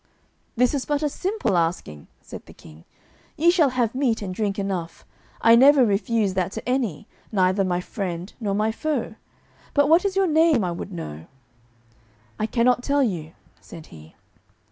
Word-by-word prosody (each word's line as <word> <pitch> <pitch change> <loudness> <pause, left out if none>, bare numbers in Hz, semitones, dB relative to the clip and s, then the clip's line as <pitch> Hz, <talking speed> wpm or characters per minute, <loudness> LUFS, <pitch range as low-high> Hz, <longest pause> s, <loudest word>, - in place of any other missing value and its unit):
"This 250 +2 +3
is 275 -3 -1
but 295 0 -1
a 300 - +1
simple 375 - -2
asking," 165 - -2 0.2
said - - -11
the - - -15
King; 80 +1 -16 0.5
"ye 340 +3 +4
shall 330 -6 +3
have 245 -3 -1
meat 255 -5 0
and 185 -2 -5
drink 205 0 -2
enough; 190 -4 -4 0.4
I 230 0 +6
never 270 +1 +6
refuse 205 0 0
that 185 -1 -1
to - - -7
any, 245 - -2 0.2
neither 190 -1 +2
my 180 -1 -1
friend 180 -1 -5
nor 205 -4 -2
my 215 +2 +1
foe. 270 -1 -3 0.6
But 285 0 +3
what 330 +3 +5
is 395 -1 -1
your 390 0 +3
name 315 - +3
I 180 - -1
would 175 +3 -7
know?" 80 - -8 1.1
"I 215 - 0
cannot 245 +2 +2
tell 280 +2 +1
you," 170 -9 -3 0.3
said 160 -2 -12
he. 80 0 -15
220 Hz, 170 wpm, -23 LUFS, 185-275 Hz, 1.1 s, I